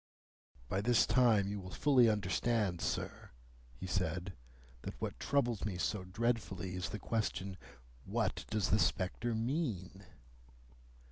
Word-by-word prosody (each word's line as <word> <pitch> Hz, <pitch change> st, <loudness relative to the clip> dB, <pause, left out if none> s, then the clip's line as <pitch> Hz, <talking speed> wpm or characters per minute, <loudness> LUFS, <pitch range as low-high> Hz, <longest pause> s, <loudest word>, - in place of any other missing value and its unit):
"By 95 Hz, +6 st, 0 dB
this 120 Hz, +2 st, +4 dB
time 115 Hz, -6 st, +4 dB
you 100 Hz, 0 st, -3 dB
will 95 Hz, -1 st, -8 dB
fully 125 Hz, +3 st, +5 dB
understand, 105 Hz, -2 st, +1 dB
sir," -, -, -3 dB, 0.5 s
he 65 Hz, -, -7 dB
said, 90 Hz, 0 st, -1 dB, 0.5 s
"that -, -, -7 dB
what -, -, -4 dB
troubles 120 Hz, -6 st, +1 dB
me 100 Hz, -3 st, -2 dB
so 95 Hz, +2 st, -1 dB
dreadfully 95 Hz, -3 st, -1 dB
is 90 Hz, 0 st, -3 dB
the 105 Hz, -, -4 dB
question, 100 Hz, -4 st, -2 dB, 0.5 s
What -, -, -1 dB
does 105 Hz, -4 st, 0 dB
the 105 Hz, -, +5 dB
spectre 110 Hz, +5 st, 0 dB
mean?" 110 Hz, -, -2 dB
100 Hz, 130 wpm, -35 LUFS, 95-115 Hz, 0.5 s, fully